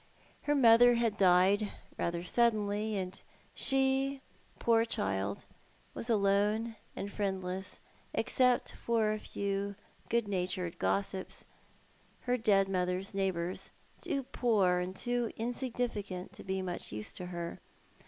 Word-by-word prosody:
Her 295 - +4
mother 240 -2 +7
had 230 -3 +1
died 195 +2 +4 0.2
rather 170 0 -2
suddenly, 215 0 +1
and 185 -1 -4 0.3
she, 270 0 +2 0.4
poor 230 -1 +3
child, 100 - -2 0.5
was 235 - -4
alone, 210 +2 +2 0.2
and 200 - -4
friendless, 190 -2 -3 0.3
except 250 -2 +2
for 225 -2 0
a 215 - -2
few 200 0 -3 0.3
good 235 -2 +1
natured 180 -3 -2
gossips, 195 -1 -2 0.8
her 250 0 +1
dead 205 -5 +3
mother's 185 +1 -1
neighbours, 185 -2 -1 0.3
too 275 - -1
poor 215 -8 +2
and 180 +1 -3
too 240 +1 -1
insignificant 230 -6 -3
to - - -10
be 190 0 -2
of - - -4
much 175 -1 -3
use 105 0 -4
to 180 - -6
her. 170 -1 -5
200 Hz, 125 wpm, -32 LUFS, 185-235 Hz, 0.8 s, mother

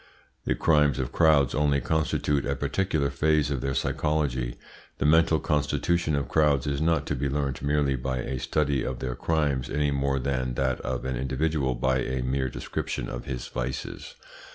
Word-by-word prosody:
The - - +1
crimes 75 -4 +3
of 65 -2 -2
crowds 75 -5 +4
only 75 -1 +2
constitute 75 -2 0
a - - -1
particular 75 -1 0
phase 75 -2 +2
of 65 -3 -1
their 70 0 -2
psychology. 70 -4 -1 0.4
The - - -1
mental 80 +1 +4
constitution 75 +2 0
of 70 -3 -1
crowds 75 -3 +2
is 70 0 -1
not 80 -3 +2
to 75 - -2
be 70 +2 -1
learnt 70 -2 -2
merely 70 -1 +1
by 65 +1 -2
a 65 +1 -3
study 70 -2 0
of 65 - -3
their 65 -2 -3
crimes, 70 -1 0
any 75 0 +1
more 70 0 0
than 65 -1 -1
that 65 -1 0
of 65 +1 -3
an 65 -1 -1
individual 65 +1 0
by 65 +1 +1
a 65 0 -2
mere 65 +1 0
description - - -4
of - - -6
his 65 -2 -5
vices. 65 +2 -5
70 Hz, 175 wpm, -27 LUFS, 65-75 Hz, 0.4 s, crowds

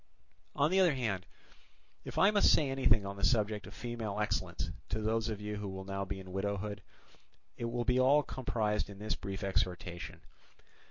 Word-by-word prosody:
On 145 +3 +3
the 190 - +4
other 175 -6 +5
hand, 105 -8 -2 0.8
if - - -7
I 200 - +6
must 205 -1 +5
say 145 -4 +3
anything 110 -6 +3
on 100 0 -5
the 100 - -6
subject 105 +1 +2
of - - -11
female 115 -4 -4
excellence 105 - -1 0.2
to 110 - -1
those 110 +1 0
of 105 -2 -3
you 105 0 -4
who 100 -1 -4
will 95 0 -6
now 100 0 -3
be 95 0 -4
in 95 -1 -10
widowhood, 100 +1 -2 0.7
it 120 - -4
will 120 +1 -1
be 125 0 +3
all 140 +3 +5
comprised 110 -6 -1
in 100 - -9
this 105 +2 -2
brief 95 -1 -5
exhortation. 90 -2 -2
105 Hz, 185 wpm, -33 LUFS, 100-120 Hz, 0.8 s, I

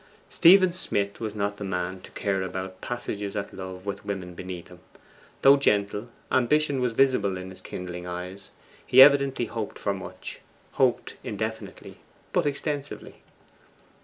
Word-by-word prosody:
Stephen 185 +1 +6
Smith 100 - -2
was 110 -2 -4
not 100 0 -2
the 105 - -6
man 95 -1 -3
to - - -12
care 100 -2 -1
about 95 0 -5
passages 105 -5 -4
at 100 - -4
love 95 0 -8
with 100 - -4
women 95 -3 -5
beneath 90 0 -7
him. 90 -1 -14 0.6
Though 140 +1 +8
gentle, 105 -3 +1 0.2
ambition 140 +2 +2
was 125 -2 0
visible 115 -7 +2
in 95 0 -7
his 95 0 -10
kindling 90 -1 -6
eyes; 90 +2 -6 0.3
he 125 - +4
evidently 140 -2 +7
hoped 110 -3 -5
for 100 - -1
much; 95 -1 -8 0.3
hoped - - +1
indefinitely, - - -5 0.3
but - - +2
extensively. 145 0 -4
100 Hz, 145 wpm, -26 LUFS, 95-130 Hz, 0.6 s, Though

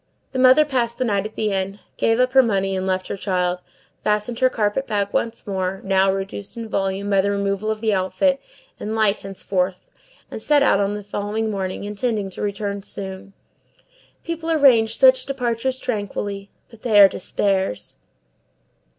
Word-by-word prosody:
The 260 - -3
mother 260 +4 +6
passed 240 -4 -1
the 255 - 0
night 205 -2 0
at 215 - -18
the 215 -1 -1
inn, 195 +1 -2 0.2
gave 225 +1 +1
up 255 +1 +2
her 265 - +8
money 195 -5 0
and 190 0 -2
left 185 0 -1
her - - -3
child, 180 -2 -1 0.4
fastened 210 +3 0
her 255 - +4
carpet 220 +4 -1
bag 200 -1 0
once 230 0 -2
more, 190 -2 -2
now 195 0 +3
reduced 195 +2 -5
in 230 -1 -5
volume 195 -1 -2
by 195 -1 +4
the 200 - 0
removal 200 +1 -1
of 215 0 -2
the 220 -2 +1
outfit, 270 +9 +1 0.4
and 215 +1 -4
light 215 -2 +2
henceforth 190 -1 -3 0.5
and - - -6
set 290 +3 +3
out 200 - +4
on 200 +1 0
the 210 - -6
following 210 +2 -3
morning, 190 -2 -3
intending 205 -1 -2
to - - -8
return 200 -1 -3
soon. 195 0 -6 0.9
People 330 -1 -4
arrange 250 -8 +4
such 260 -1 +5
departures 255 -1 -1
tranquilly; 205 -4 -4 0.2
but 230 -2 -16
they 215 -4 +4
are 200 - +10
despairs! 190 - -2
205 Hz, 175 wpm, -21 LUFS, 195-235 Hz, 0.9 s, are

